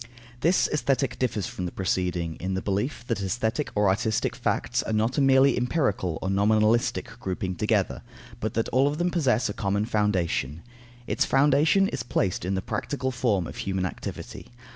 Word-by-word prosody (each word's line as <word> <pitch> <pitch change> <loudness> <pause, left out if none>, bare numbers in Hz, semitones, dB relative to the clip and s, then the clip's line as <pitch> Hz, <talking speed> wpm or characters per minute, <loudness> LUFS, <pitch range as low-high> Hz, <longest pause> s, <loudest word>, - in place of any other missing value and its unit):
This 170 +7 +3
Aesthetic 135 -3 0
differs 115 -6 0
from 90 - -4
the - - -6
preceding, 90 -3 -1
in 95 +1 -3
the 95 - -2
belief 105 +6 -2
that 115 -4 -2
aesthetic 110 +8 -1
or 105 -1 +3
artistic 110 +3 0
facts - - 0
are 110 - -3
not 110 +6 +1
a - - +3
merely 135 0 +5
empirical 120 - 0
or 95 - -1
nominalistic 110 +3 +2
grouping 95 0 -3
together, 85 - 0 0.4
but 110 0 -3
that 115 - +1
all 130 +3 +3
of 145 +1 -1
them 175 +1 0
possess 130 -8 +2
a 105 - -3
common 100 +1 -1
foundation. 90 - 0 0.4
Its - - +1
foundation 145 +8 +4
is - - -3
placed 95 -7 -1
in 95 +1 -1
the 95 - -2
practical 130 +4 -2
form 115 -8 0
of - - -8
human 95 -1 -2
activity. 90 - -7
110 Hz, 175 wpm, -26 LUFS, 95-130 Hz, 0.4 s, merely